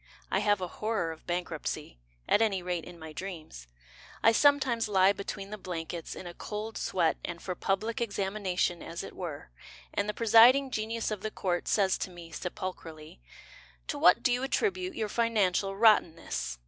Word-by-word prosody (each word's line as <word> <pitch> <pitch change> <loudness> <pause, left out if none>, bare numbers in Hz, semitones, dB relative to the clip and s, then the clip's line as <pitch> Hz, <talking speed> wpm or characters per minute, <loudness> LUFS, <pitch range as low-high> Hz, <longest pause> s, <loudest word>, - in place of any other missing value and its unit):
I 190 - +2
have 205 -1 +2
a 180 - -2
horror 210 -3 -2
of 160 - -12
bankruptcy, 170 - -4 0.3
At 210 - +4
any 195 -5 +1
rate 175 -2 -2
in 175 -1 -11
my 160 -1 -9
dreams. 160 - -8 0.6
I 225 - +7
sometimes 260 -3 +3
lie 195 -1 +4
Between 200 0 -6
the 210 - -6
blankets 170 -2 -5
In - - -8
a 175 - -7
cold 215 +4 -6
sweat 170 -3 +1
And 170 -1 -5
for 185 - -4
public 210 +6 -1
examination 195 -5 -1
as 170 +2 -6
it - - -9
were, 155 - -6 0.4
And 205 - -1
the 210 - -2
presiding 240 +4 +6
genius 220 0 -2
of 210 -3 -3
the 215 - -2
court 180 -4 -2
Says 195 -3 +2
to - - -3
me, 170 -2 -11
sepulchrally, 165 - -7 0.7
"To - - -2
what 180 - +6
do 250 - +3
you 245 - 0
attribute 370 +6 -1
your 220 - -1
financial 205 -4 +1
rottenness?" 175 - +2
195 Hz, 175 wpm, -30 LUFS, 175-220 Hz, 0.7 s, I